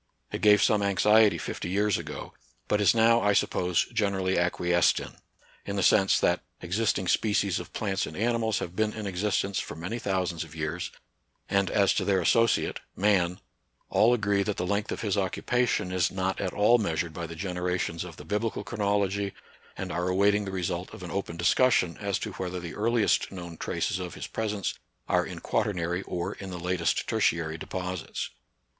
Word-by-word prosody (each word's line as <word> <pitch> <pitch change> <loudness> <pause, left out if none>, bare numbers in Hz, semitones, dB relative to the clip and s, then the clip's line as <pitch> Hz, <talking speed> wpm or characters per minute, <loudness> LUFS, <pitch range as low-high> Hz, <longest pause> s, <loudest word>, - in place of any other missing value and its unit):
It - - -4
gave 105 0 +6
some 105 -2 +3
anxiety 105 +2 +4
fifty - - -5
years 100 +1 +1
ago; - - -7 0.3
but 105 0 +1
is 100 +1 +5
now, 115 +1 +5
I 105 0 +3
suppose, 90 -3 +1
generally 95 -3 +1
acquiesced 85 0 +2
in, - - -7 0.3
— - - -30
in 100 - -2
the 100 - 0
sense 95 0 +4
that - - +2 0.2
existing 95 +1 0
species 100 -3 +2
of - - -9
plants 100 -3 -1
and - - -8
animals 115 -1 +1
have 85 - -5
been 110 0 +1
in 110 -1 -5
existence 100 +1 0
for - - -5
many 90 +9 -4
thou 95 -4 0
sands 85 -2 -3
of 80 -1 -13
years; 80 +2 -3 0.6
and, 100 -1 +2
as 100 -2 +3
to - - 0
their 95 -2 +2
associate, 115 +6 +2 0.2
man, 95 -3 +2 0.5
all 115 - +5
agree 100 -3 +1
that 100 0 -2
the 90 - -1
length 100 +2 -1
of - - -3
his 105 -2 0
occupation 105 0 0
is 90 -2 +2
not 95 0 -2
at 95 -2 -1
all 110 +4 +4
measured 80 -5 -1
by 85 +1 -5
the 85 - -8
generations 90 -1 -2
of 85 -3 -10
the 75 - -10
bibli 105 +5 0
cal - - -6
chronology, 100 -2 -1 0.4
and - - -4
are 90 +2 -1
awaiting 100 +2 +3
the 95 - -4
result 90 -1 -3
of 95 - -10
an 85 - -6
open 90 -3 -3
discussion 90 0 +3
as 100 -2 0
to 110 - -5
whether 90 -1 -4
the 85 -1 -7
earliest 115 +1 +1
known 85 -3 -7
traces 100 +4 -2
of 90 -1 -6
his - - -6
presence 105 -4 -2 0.3
are - - +2
in - - -7
quaternary 90 -3 -1
or 85 -1 -3
in 95 - -8
the 90 - -5
latest 90 -1 0
tertiary 80 -1 +1
deposits. 90 +2 -4
95 Hz, 190 wpm, -28 LUFS, 90-105 Hz, 0.6 s, gave